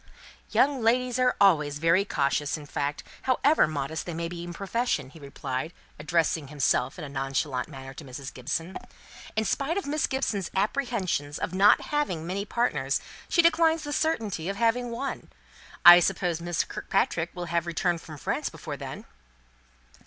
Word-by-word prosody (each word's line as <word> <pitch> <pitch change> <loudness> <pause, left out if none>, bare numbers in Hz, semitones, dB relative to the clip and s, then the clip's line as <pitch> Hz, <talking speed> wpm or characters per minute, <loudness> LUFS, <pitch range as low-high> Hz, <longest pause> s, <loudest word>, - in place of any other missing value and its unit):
"Young 275 -2 +2
ladies 250 +2 +2
are 250 0 +3
always 150 -7 +4
very 165 +5 +3
cautious 145 -2 0
in 150 - -10
fact, 145 0 -3 0.2
however 270 - +3
modest 155 +2 -4
they 170 - -4
may 170 0 -2
be 170 0 -6
in 175 - -6
profession," 195 - -2
he 160 - -14
replied, 140 +1 -5 0.3
addressing 160 -1 0
himself 135 -2 0
in 165 - -6
a - - -6
nonchalant 135 -1 -2
manner 135 -3 -9
to 155 - -10
Mrs. 135 0 -8
Gibson. 165 +8 -4 0.6
"In 220 - +1
spite 285 - 0
of 400 - -2
Miss 295 +2 0
Gibson's 215 -8 -1
apprehension 205 - -1
of - - -3
not 195 +2 +6
having 190 - -2
many 195 +3 -3
partners, 235 +4 0 0.3
she 340 - +4
declines 330 -1 +4
the 290 -1 -4
certainty 220 - -1
of 195 - -2
having 235 +3 +1
one. 250 +4 -5 0.6
I 175 0 +12
suppose 175 -1 0
Miss 175 -1 0
Kirkpatrick 170 -3 -1
will 175 -1 -4
have 170 0 -1
returned 170 0 0
from 155 -2 -10
France - - -2
before - - -7
then?" - - -7
175 Hz, 165 wpm, -27 LUFS, 150-235 Hz, 0.6 s, I